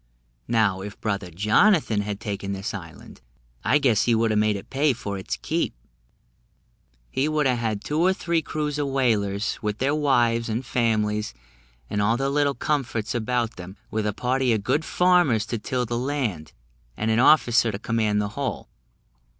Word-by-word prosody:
Now, 105 -5 +2
if 100 +1 -8
brother 100 -4 -2
Jonathan 105 - +3
had 105 -1 -4
taken 100 -2 -4
this 100 +4 -4
island, 80 -6 -10 0.4
I - - +4
guess 130 -8 +2
he 120 - +3
would 115 0 +2
a' - - +1
made 105 0 +2
it 100 - -9
pay 140 +1 +2
for 105 -4 -5
its 95 - -4
keep; - - -2 1.4
he 140 +3 0
would 155 -1 +1
have 125 -2 +2
had 110 -3 -2
two 150 +1 -2
or 180 +3 +4
three 170 -3 0
crews 150 -1 -3
of 145 - 0
whalers, 110 -7 0
with 105 -1 -2
their 135 +4 +1
wives 120 -6 +2
and 115 +4 -2
families, 105 - 0 0.5
and 105 - -1
all 115 +3 +2
their 135 +1 0
little 140 0 +1
comforts 125 -7 -2
about 120 0 -1
them, 90 +2 -9
with 110 -1 -1
a - - +1
party 125 +2 0
of 105 -3 -1
good 150 +9 +1
farmers 175 - +3
to 115 -1 -3
till 125 +3 -2
the 120 +1 -2
land, 125 - -2 0.5
and 110 +1 0
an 110 - +2
officer 120 -4 +5
to 100 - -4
command 110 -1 0
the 105 0 -1
whole. 130 0 -4
115 Hz, 180 wpm, -24 LUFS, 105-135 Hz, 1.4 s, officer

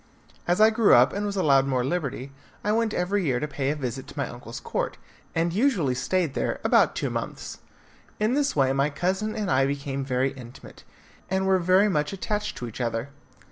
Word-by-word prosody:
As 175 +2 +2
I 215 +1 +7
grew 220 -1 +5
up, 125 +2 +5
and 205 +1 -2
was 200 - -3
allowed 140 -7 +3
more 130 -2 0
liberty, 140 -4 -3 0.3
I 210 - +1
went 225 0 +1
every 195 +1 0
year 130 -6 +1
to 150 - -2
pay 140 -2 -2
a 150 - 0
visit 130 -2 -5
to - - -13
my - - -1
uncle's - - -8
court, - - -3 0.4
and 165 +1 +1
usually 200 - +2
stayed 160 +4 0
there - - -2
about - - +4
two - - -2
months. - - -5 0.6
In 215 +3 +1
this 285 0 +1
way 135 -2 +3
my 140 +2 +1
cousin 190 +7 -2
and 210 -6 -2
I 135 +1 +3
became 140 -1 -3
very 130 0 0
intimate, 125 -2 -12 0.5
and 190 0 0
were 190 +1 +4
much 150 -5 0
attached 210 +2 -3
to 120 - -5
each 115 +2 -7
other. 115 +2 -2
155 Hz, 200 wpm, -25 LUFS, 135-200 Hz, 0.6 s, I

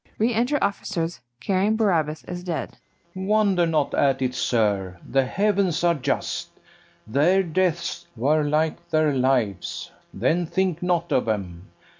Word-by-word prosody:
Re 230 +3 +2
enter 245 +6 +1
OFFICERS, 180 -4 -2 0.2
carrying 195 - +1
BARABAS 160 -8 +1
as 180 0 -6
dead. 175 -3 -4 0.4
FERNEZE. 190 0 -5
Wonder 200 -5 +3
not 155 -3 0
at 135 -1 +2
it, 125 -1 0
sir; 100 -8 0
the 135 0 +2
heavens 195 -1 +1
are 170 -1 +4
just; 140 -3 -2 0.6
Their 160 - +3
deaths 175 0 -1
were 145 +7 +2
like 150 +2 -1
their 155 -2 +2
lives; 125 -8 0 0.2
then 175 +1 0
think 185 -2 0
not 175 -1 0
of 125 - +2
'em. 95 -4 -3
165 Hz, 140 wpm, -24 LUFS, 135-185 Hz, 0.6 s, are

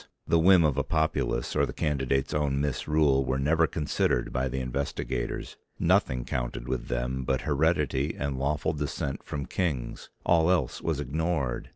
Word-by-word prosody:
The 85 - +3
whim 90 +1 +6
of 75 -3 +2
a - - +1
populace 80 0 0
or - - +3
the - - -6
candidate's 70 -2 0
own 70 -2 0
misrule 70 0 +2
were 65 +1 -1
never 80 +4 +3
considered 65 -5 0
by 65 +1 0
the 65 +1 -3
investigators, 65 -1 -3 0.2
nothing 60 -2 +2
counted - - -3
with 65 -1 -3
them 60 +2 -2
but 65 0 0
heredity 75 -1 +1
and 70 -2 -2
lawful 75 +3 0
descent 70 -2 -3
from 70 -1 -5
kings, 70 -10 -3 0.2
all 85 -1 +4
else 90 -2 +1
was 80 -4 -1
ignored. 75 -2 -2
70 Hz, 160 wpm, -28 LUFS, 65-80 Hz, 0.2 s, whim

